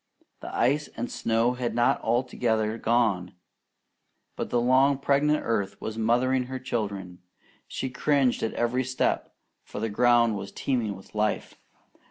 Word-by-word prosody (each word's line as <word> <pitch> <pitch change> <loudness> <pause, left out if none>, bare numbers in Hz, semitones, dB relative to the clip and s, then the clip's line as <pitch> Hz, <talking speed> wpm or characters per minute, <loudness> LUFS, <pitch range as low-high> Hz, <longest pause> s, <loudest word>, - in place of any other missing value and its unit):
The - - -8
ice 145 +5 +1
and 120 - -3
snow 115 +2 +1
had 125 -1 -3
not 120 0 +2
altogether 115 -2 0
gone; 105 -7 +1 1.0
but - - -4
the 120 - +1
long 130 +3 +4
pregnant 145 +2 +2
earth 100 -3 -1
was 110 - -5
mothering 125 +3 +1
her 130 +1 -5
children. 100 -8 -4 0.5
She 130 - -4
cringed 135 -1 +1
at 115 - -2
every 120 +2 0
step, 130 +1 -1 0.3
for - - -8
the 110 +1 -1
ground 120 0 +3
was 100 0 -7
teeming 115 -6 -1
with 95 - -15
life. 105 0 -1
120 Hz, 145 wpm, -26 LUFS, 110-130 Hz, 1.0 s, long